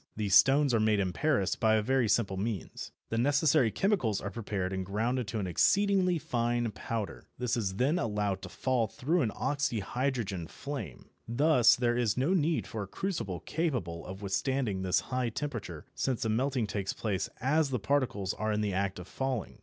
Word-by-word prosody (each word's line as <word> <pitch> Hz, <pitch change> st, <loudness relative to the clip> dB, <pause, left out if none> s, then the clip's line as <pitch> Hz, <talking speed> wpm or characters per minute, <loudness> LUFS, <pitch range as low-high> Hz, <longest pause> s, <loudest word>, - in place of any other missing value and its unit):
These 105 Hz, -3 st, -1 dB
stones 135 Hz, +7 st, +6 dB
are 115 Hz, -, +3 dB
made 110 Hz, -1 st, +3 dB
in 95 Hz, -2 st, 0 dB
Paris 130 Hz, -, +1 dB
by 110 Hz, -1 st, +3 dB
a 110 Hz, -, +3 dB
very 130 Hz, -1 st, +2 dB
simple 100 Hz, -3 st, +2 dB
means. 100 Hz, -1 st, -4 dB, 0.2 s
The 115 Hz, -, -1 dB
necessary 145 Hz, 0 st, +3 dB
chemicals 115 Hz, -, +1 dB
are 100 Hz, -, -5 dB
prepared 100 Hz, -4 st, -3 dB
and 95 Hz, 0 st, -2 dB
ground 115 Hz, +7 st, -1 dB
to 110 Hz, -, -3 dB
an 100 Hz, -, -1 dB
exceedingly 190 Hz, -, +3 dB
fine 120 Hz, -6 st, -1 dB
powder. 110 Hz, -1 st, -5 dB
This 125 Hz, -1 st, 0 dB
is 100 Hz, -5 st, -2 dB
then 140 Hz, -, +2 dB
allowed 105 Hz, -3 st, -1 dB
to -, -, -7 dB
fall 125 Hz, -4 st, 0 dB
through 160 Hz, -, 0 dB
an 120 Hz, -, +1 dB
oxyhydrogen 120 Hz, -, -2 dB
flame. 140 Hz, -, -7 dB, 0.2 s
Thus 125 Hz, 0 st, +5 dB
there 120 Hz, -1 st, +1 dB
is 120 Hz, -3 st, +1 dB
no 140 Hz, +8 st, +2 dB
need 165 Hz, -2 st, +1 dB
for 110 Hz, -, -5 dB
a 100 Hz, -, -5 dB
crucible 100 Hz, -, -3 dB
capable 120 Hz, -, -2 dB
of 95 Hz, +3 st, -8 dB
withstanding 100 Hz, +1 st, -1 dB
this 95 Hz, 0 st, +2 dB
high 125 Hz, -1 st, -2 dB
temperature, 110 Hz, -, -5 dB
since 130 Hz, -3 st, -1 dB
the 110 Hz, -, 0 dB
melting 125 Hz, +2 st, +1 dB
takes 100 Hz, -2 st, -3 dB
place 100 Hz, -4 st, -2 dB
as 145 Hz, +4 st, +2 dB
the 130 Hz, -, 0 dB
particles 105 Hz, -5 st, 0 dB
are 110 Hz, 0 st, -2 dB
in 105 Hz, 0 st, 0 dB
the 105 Hz, -2 st, -1 dB
act 95 Hz, 0 st, -1 dB
of 90 Hz, 0 st, -8 dB
falling. 130 Hz, -5 st, -3 dB
115 Hz, 185 wpm, -30 LUFS, 100-135 Hz, 0.2 s, stones